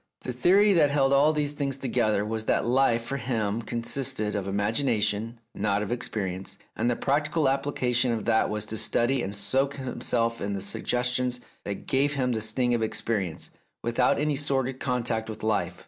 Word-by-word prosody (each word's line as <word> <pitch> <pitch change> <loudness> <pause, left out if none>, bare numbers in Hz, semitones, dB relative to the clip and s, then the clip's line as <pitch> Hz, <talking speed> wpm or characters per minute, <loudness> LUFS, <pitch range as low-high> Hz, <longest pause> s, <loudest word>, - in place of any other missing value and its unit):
The 125 - -4
theory 195 - +4
that 155 -5 +4
held 140 -1 +2
all 145 +3 +5
these 150 -2 0
things 140 -2 -2
together 110 -6 0
was 110 0 -3
that - - +1
life 120 -1 +2
for 140 +4 -3
him 115 -3 -1
consisted 115 -2 -2
of 100 -2 -2
imagination, 110 +1 0
not 100 0 0
of 105 - -5
experience, 95 -6 -3 0.2
and 115 +2 0
the 120 - +1
practical 150 +3 +1
application 130 -3 +1
of 110 -2 -2
that 110 -1 +2
was 105 0 -3
to 110 0 -3
study 125 +2 +1
and 100 -2 -3
soak 135 +6 +1
himself 120 -3 -1
in 100 0 -2
the 100 - -3
suggestions 125 +3 -1 0.3
that 100 -1 -5
gave 140 +2 +1
him 130 -2 0
the 110 -2 -1
sting 120 +3 +1
of 120 - +1
experience, 105 -6 -2 0.3
without 120 +2 +2
any 150 0 0
sordid 135 -2 0
contact 115 -3 -1
with 110 0 -7
life. 90 -5 -1
120 Hz, 180 wpm, -27 LUFS, 110-135 Hz, 0.3 s, all